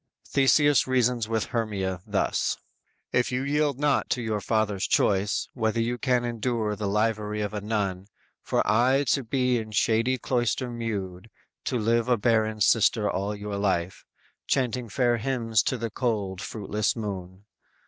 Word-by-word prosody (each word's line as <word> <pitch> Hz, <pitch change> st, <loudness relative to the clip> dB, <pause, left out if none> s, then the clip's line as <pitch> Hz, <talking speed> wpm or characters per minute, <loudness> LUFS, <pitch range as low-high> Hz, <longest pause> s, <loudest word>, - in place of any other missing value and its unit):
Theseus 140 Hz, 0 st, +4 dB
reasons 125 Hz, -3 st, +1 dB
with 110 Hz, -2 st, 0 dB
Hermia 100 Hz, -6 st, -2 dB
thus: -, -, 0 dB, 0.6 s
_"If 125 Hz, 0 st, +2 dB
you 125 Hz, +1 st, -1 dB
yield 145 Hz, -1 st, +1 dB
not 145 Hz, 0 st, +1 dB
to 125 Hz, -, 0 dB
your 110 Hz, -2 st, -2 dB
father's 105 Hz, -2 st, 0 dB
choice, 100 Hz, 0 st, +1 dB
Whether 110 Hz, -1 st, 0 dB
you 120 Hz, +2 st, -1 dB
can 125 Hz, -2 st, +1 dB
endure 115 Hz, -2 st, -1 dB
the 105 Hz, -1 st, -3 dB
livery 105 Hz, 0 st, 0 dB
of 105 Hz, 0 st, -3 dB
a 105 Hz, -, -3 dB
nun; 100 Hz, -3 st, -2 dB, 0.3 s
For -, -, 0 dB
aye 130 Hz, +6 st, +3 dB
to 135 Hz, -, +2 dB
be 125 Hz, 0 st, +1 dB
in 110 Hz, -1 st, -6 dB
shady 115 Hz, +4 st, +2 dB
cloister 125 Hz, 0 st, -1 dB
mewed, 105 Hz, -4 st, -4 dB, 0.4 s
To 125 Hz, -, 0 dB
live 115 Hz, +1 st, +1 dB
a 120 Hz, -, +4 dB
barren 110 Hz, -1 st, +1 dB
sister 110 Hz, 0 st, +3 dB
all 100 Hz, +1 st, -2 dB
your 100 Hz, 0 st, -5 dB
life; 95 Hz, -3 st, -1 dB, 0.4 s
Chanting 125 Hz, -3 st, 0 dB
fair 120 Hz, +2 st, +2 dB
hymns 115 Hz, -3 st, +1 dB
to 130 Hz, -, -1 dB
the 115 Hz, -1 st, -4 dB
cold, 100 Hz, -6 st, -2 dB
fruitless 105 Hz, -1 st, -2 dB
moon. 95 Hz, -3 st, -6 dB
110 Hz, 155 wpm, -26 LUFS, 105-125 Hz, 0.6 s, Theseus